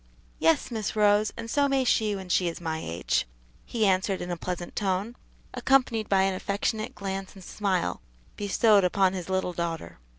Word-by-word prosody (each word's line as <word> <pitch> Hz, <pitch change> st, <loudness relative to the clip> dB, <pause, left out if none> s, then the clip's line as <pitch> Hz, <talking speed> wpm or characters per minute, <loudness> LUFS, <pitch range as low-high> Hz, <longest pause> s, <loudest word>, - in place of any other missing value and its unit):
"Yes, 320 Hz, -5 st, +2 dB
Miss 220 Hz, -3 st, -3 dB
Rose; 210 Hz, 0 st, +4 dB
and 230 Hz, -, -5 dB
so 285 Hz, +4 st, +2 dB
may 275 Hz, -1 st, +2 dB
she 215 Hz, -4 st, +2 dB
when 190 Hz, -1 st, -7 dB
she 180 Hz, 0 st, +2 dB
is 165 Hz, -, -4 dB
my 160 Hz, -2 st, -3 dB
age," 85 Hz, -6 st, -1 dB, 0.4 s
he 225 Hz, -3 st, 0 dB
answered 190 Hz, 0 st, +2 dB
in 175 Hz, -, -4 dB
a -, -, -1 dB
pleasant 175 Hz, +1 st, -5 dB
tone, 200 Hz, +3 st, -1 dB, 0.4 s
accompanied 250 Hz, -3 st, +2 dB
by 190 Hz, -1 st, +4 dB
an 195 Hz, 0 st, +1 dB
affectionate 205 Hz, +3 st, -2 dB
glance 195 Hz, -1 st, -5 dB
and 190 Hz, -, -12 dB
smile 185 Hz, -, -1 dB, 0.3 s
bestowed 205 Hz, 0 st, +3 dB
upon 185 Hz, +1 st, +3 dB
his 185 Hz, -1 st, -5 dB
little 190 Hz, -1 st, 0 dB
daughter. 165 Hz, -, -4 dB
195 Hz, 175 wpm, -27 LUFS, 180-215 Hz, 0.4 s, Rose